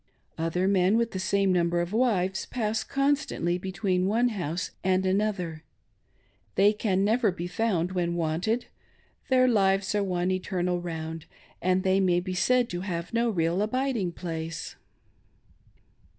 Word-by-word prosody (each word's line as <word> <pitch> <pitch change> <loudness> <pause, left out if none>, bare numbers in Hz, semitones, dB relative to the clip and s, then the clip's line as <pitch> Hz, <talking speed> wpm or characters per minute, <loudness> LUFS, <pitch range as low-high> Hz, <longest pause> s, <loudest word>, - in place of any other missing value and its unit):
Other 165 +3 0
men 195 +2 +3
with 235 0 0
the 190 - -4
same 195 0 +2
number 175 -1 +1
of 175 +3 -2
wives 195 -6 +1
pass 220 -3 -1
constantly 275 - 0
between 185 0 -1
one 235 +4 +2
house 175 -5 -3
and 185 0 +2
another; 185 -5 -1 0.9
they 205 +2 +5
can 200 -2 0
never 220 0 +2
be 175 -1 -5
found 180 -3 0
when 175 -2 -1
wanted; 175 +8 -1 0.6
their 255 -1 +5
lives 195 -4 +2
are 205 -1 +1
one 180 -1 0
eternal 180 -1 -1
round, 160 -2 -5 0.3
and 185 +1 +2
they 190 0 +3
may 180 -2 +3
be 185 +1 -4
said 245 +7 +2
to 175 0 -4
have 175 0 -4
no 235 0 +2
real 170 -2 0
abiding 230 -4 0
place. 165 -2 -5
185 Hz, 145 wpm, -27 LUFS, 175-215 Hz, 0.9 s, they